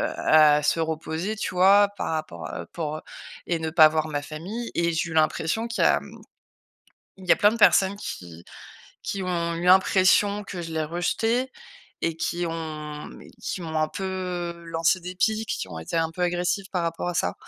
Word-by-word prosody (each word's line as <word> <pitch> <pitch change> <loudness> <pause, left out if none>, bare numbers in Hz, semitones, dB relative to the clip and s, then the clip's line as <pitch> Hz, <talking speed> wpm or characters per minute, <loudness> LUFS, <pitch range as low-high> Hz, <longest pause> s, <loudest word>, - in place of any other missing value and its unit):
à 150 -1 +5
se 165 - +1
reposer, 160 +5 -2
tu 205 - -4
vois, 200 +3 +6
par - - -2
rapport, 85 - -5
heu, 85 - -5
pour, 155 -2 -4
heu - - -9 0.5
et 170 -2 0
ne 160 0 -2
pas 160 -1 +7
voir 155 0 -1
ma 145 -2 -3
famille 185 +11 -6
et 170 0 +1
j'ai 165 +1 -1
eu - - -6
l'impression 160 +7 +1
qu'il 230 - -1
y - - +6
a, - - +3
mmh, - - -13 1.0
il 190 - -13
y - - +8
a - - +4
plein 205 - +5
de 230 - -3
personnes 200 -2 +5
qui 85 - -8 0.6
qui 195 - -3
ont 170 -2 -1
eu 170 - -4
l'impression 190 +2 +4
que 185 -3 -6
je 165 - -7
les 155 - 0
rejetais 225 +10 -1 0.5
et 165 -1 -1
qui 175 +1 -2
ont, 155 -2 -6
mmh, - - -12 0.2
qui 185 - -4
m'ont 160 -1 -3
un 155 - +1
peu, 195 - -6
heu, 180 -2 -4
lancé 165 +3 +1
des 180 +1 -7
pics, 220 +3 0
qui 95 - -3
ont 80 - -7
été 80 - -5
un 165 0 +1
peu 170 - -10
agressifs 180 +3 -1
par 180 -2 -1
rapport 165 +1 -2
à 180 - -3
ça 90 - 0
170 Hz, 210 wpm, -25 LUFS, 155-190 Hz, 1.0 s, y